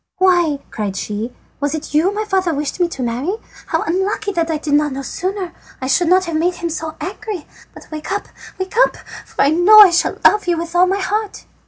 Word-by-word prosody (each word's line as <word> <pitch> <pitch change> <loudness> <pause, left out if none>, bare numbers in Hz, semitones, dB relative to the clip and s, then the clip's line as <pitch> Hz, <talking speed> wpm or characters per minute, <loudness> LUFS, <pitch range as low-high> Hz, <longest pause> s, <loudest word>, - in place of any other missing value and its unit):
"Why," 350 -5 +3
cried 200 -3 -3
she, 215 +3 -4 0.3
"was 285 +2 -1
it 315 -1 -7
you 325 +6 +3
my 425 +1 -3
father 375 -5 0
wished 290 +4 -3
me 350 - +3
to 270 -6 -5
marry? 250 - -2 0.3
How 325 - 0
unlucky 385 +4 -1
that 335 -3 -1
I 320 - 0
did 300 -1 -3
not 295 -1 +2
know 275 +1 -5
sooner! 370 +4 -4 0.3
I 260 - -4
should 275 +6 +2
not 370 +2 +4
have 335 -2 -2
made 350 +3 +1
him 340 -1 -4
so 320 0 -4
angry. 390 -2 -5 0.3
But - - -13
wake 305 +3 -6
up! 405 +1 -2 0.3
wake 375 0 -5
up! - - +4 0.3
for - - 0
I 280 - +4
know 360 +7 +7
I 405 -4 +10
shall 345 - +1
love 415 -2 +5
you 345 -1 +2
with 335 0 -5
all 360 +1 +5
my 385 +2 +1
heart." 415 +1 -3
345 Hz, 225 wpm, -18 LUFS, 300-380 Hz, 0.3 s, I